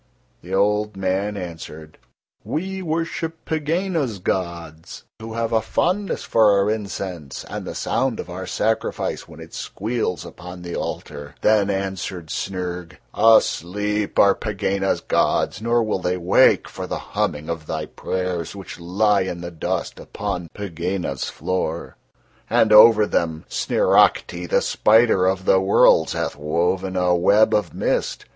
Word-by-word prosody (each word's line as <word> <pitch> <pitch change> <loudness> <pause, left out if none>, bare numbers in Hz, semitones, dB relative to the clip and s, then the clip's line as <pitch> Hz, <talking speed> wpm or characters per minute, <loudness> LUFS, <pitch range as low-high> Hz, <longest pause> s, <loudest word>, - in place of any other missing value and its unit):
The 90 +3 -4
old 105 +1 +1
man 95 +2 -1
answered: 80 -3 -8 0.4
"We 190 +4 -3
worship 165 -1 -3
Pegāna's 160 - -1
gods, 85 -3 -4 0.2
who 110 0 -7
have 115 0 -1
a 110 - +3
fondness 185 - -1
for 110 -2 +4
our 100 +1 +2
incense 95 -8 -5
and - - -6
the - - -6
sound 130 -3 -1
of - - -5
our 90 +1 -6
sacrifice 110 +4 -1
when - - -13
it - - -12
squeals 110 -4 -3
upon 90 0 -10
the 85 -1 -5
altar." 70 -2 -6
Then 105 -2 +3
answered 95 -4 -3
Snyrg: 90 -2 -4 0.2
"Asleep 105 -1 +2
are 100 -1 +6
Pegāna's 100 -2 -1
gods, 100 - 0
nor 115 +1 +2
will 105 -3 -1
They 90 0 -1
wake 90 +1 +4
for - - -7
the - - -3 0.2
humming 75 +1 -1
of 85 -2 -5
thy - - -3
prayers 90 -2 -4
which 95 -3 -9
lie 100 +4 +2
in 90 -2 -4
the 85 0 -6
dust 80 - -3
upon 90 -5 -5
Pegāna's 90 -6 -3
floor, 85 -3 -3 0.5
and 110 -1 +4
over 110 0 +8
Them 80 -5 -1
Sniracte, 90 -1 +2
the - - +2
spider 110 -4 +4
of 95 0 -1
the 95 - +5
worlds, 95 -4 +4
hath - - -2
woven 90 +5 -1
a 90 -1 +2
web 100 +5 +4
of 105 - 0
mist. - - -1
95 Hz, 140 wpm, -22 LUFS, 90-110 Hz, 0.5 s, over